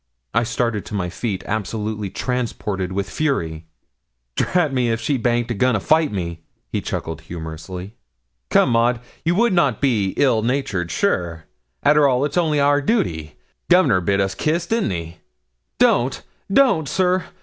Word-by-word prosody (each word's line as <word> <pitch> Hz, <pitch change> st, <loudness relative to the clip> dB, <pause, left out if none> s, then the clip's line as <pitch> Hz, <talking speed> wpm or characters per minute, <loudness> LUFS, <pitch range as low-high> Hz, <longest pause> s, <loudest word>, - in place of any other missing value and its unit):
I 115 Hz, -, +3 dB
started 115 Hz, -2 st, -1 dB
to 105 Hz, -, -6 dB
my 90 Hz, -3 st, -2 dB
feet, 100 Hz, -1 st, -3 dB
absolutely 105 Hz, -1 st, -3 dB
transported 105 Hz, -6 st, -3 dB
with 100 Hz, +1 st, -2 dB
fury. 85 Hz, -, -2 dB, 0.7 s
'Drat 165 Hz, -6 st, +1 dB
me, 125 Hz, -2 st, +1 dB
if 115 Hz, 0 st, 0 dB
she 145 Hz, -, 0 dB
baint 120 Hz, -1 st, 0 dB
a -, -, +1 dB
going 125 Hz, +3 st, +2 dB
to -, -, +1 dB
fight 155 Hz, +8 st, +2 dB
me!' 85 Hz, -4 st, -4 dB, 0.3 s
he -, -, -1 dB
chuckled 80 Hz, 0 st, -4 dB
humorously. 85 Hz, +4 st, -7 dB, 0.6 s
'Come, -, -, +4 dB
Maud, 120 Hz, +1 st, +2 dB, 0.2 s
you 170 Hz, +2 st, +1 dB
would 235 Hz, +1 st, +3 dB
not 140 Hz, -, +2 dB
be 110 Hz, -9 st, +1 dB
ill 125 Hz, -6 st, +3 dB
natured, 110 Hz, -8 st, -1 dB
sure? 85 Hz, -1 st, -1 dB, 0.4 s
Arter 150 Hz, 0 st, +5 dB
all, 130 Hz, +1 st, +2 dB
it's 150 Hz, -, -4 dB
only 160 Hz, -4 st, +2 dB
our 145 Hz, 0 st, +3 dB
duty. 85 Hz, -, -1 dB, 0.3 s
Governor 175 Hz, -, +5 dB
bid 100 Hz, +3 st, +1 dB
us 95 Hz, -1 st, +1 dB
kiss, 165 Hz, -, 0 dB
didn't 225 Hz, +4 st, 0 dB
he?' 85 Hz, -2 st, -5 dB, 0.6 s
'Don't 125 Hz, +3 st, +2 dB, 0.3 s
don't, 195 Hz, -, +4 dB
sir. 185 Hz, 0 st, +1 dB
115 Hz, 160 wpm, -21 LUFS, 95-145 Hz, 0.7 s, Arter